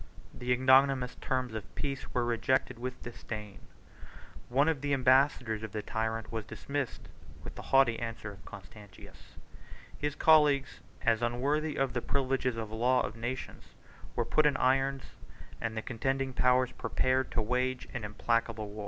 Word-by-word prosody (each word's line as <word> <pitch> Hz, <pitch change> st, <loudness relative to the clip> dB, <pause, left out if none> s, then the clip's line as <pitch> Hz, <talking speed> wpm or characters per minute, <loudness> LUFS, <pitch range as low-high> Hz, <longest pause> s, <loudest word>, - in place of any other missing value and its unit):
The 125 Hz, 0 st, -4 dB
ignominious 130 Hz, 0 st, +4 dB
terms 130 Hz, -3 st, -1 dB
of 105 Hz, -4 st, -7 dB
peace 140 Hz, -2 st, -4 dB
were 120 Hz, -1 st, 0 dB
rejected 120 Hz, +1 st, 0 dB
with 125 Hz, +1 st, -5 dB
disdain. 110 Hz, -4 st, -7 dB, 0.9 s
One 135 Hz, +5 st, +3 dB
of 160 Hz, -5 st, 0 dB
the 145 Hz, 0 st, 0 dB
ambassadors 130 Hz, -4 st, +3 dB
of 110 Hz, -3 st, -7 dB
the 105 Hz, -1 st, -3 dB
tyrant 110 Hz, 0 st, -3 dB
was 110 Hz, -1 st, -3 dB
dismissed 140 Hz, +4 st, -5 dB, 0.4 s
with -, -, -7 dB
the -, -, -8 dB
haughty 135 Hz, -4 st, +3 dB
answer 115 Hz, -3 st, -5 dB
of 100 Hz, 0 st, -14 dB
Constantius; 100 Hz, 0 st, -13 dB, 0.6 s
his 150 Hz, 0 st, -3 dB
colleagues, 150 Hz, -4 st, +4 dB, 0.2 s
as 115 Hz, -1 st, +3 dB
unworthy 140 Hz, +6 st, 0 dB
of 135 Hz, -2 st, 0 dB
the 120 Hz, -, -1 dB
privileges 130 Hz, -3 st, 0 dB
of 110 Hz, -2 st, -4 dB
the 110 Hz, -, -6 dB
law 125 Hz, +3 st, +3 dB
of 110 Hz, -, -4 dB
nations, 120 Hz, +3 st, -6 dB, 0.4 s
were -, -, 0 dB
put 155 Hz, -1 st, +3 dB
in 140 Hz, -2 st, +1 dB
irons; 135 Hz, +1 st, +2 dB, 0.6 s
and 115 Hz, -1 st, -3 dB
the 110 Hz, -, -2 dB
contending 135 Hz, +2 st, -2 dB
powers 125 Hz, 0 st, +3 dB
prepared 130 Hz, 0 st, 0 dB
to 110 Hz, -, +1 dB
wage 125 Hz, +3 st, -1 dB
an 120 Hz, -, -4 dB
implacable 110 Hz, 0 st, -1 dB
war. 105 Hz, -, -9 dB
125 Hz, 160 wpm, -31 LUFS, 115-135 Hz, 0.9 s, ignominious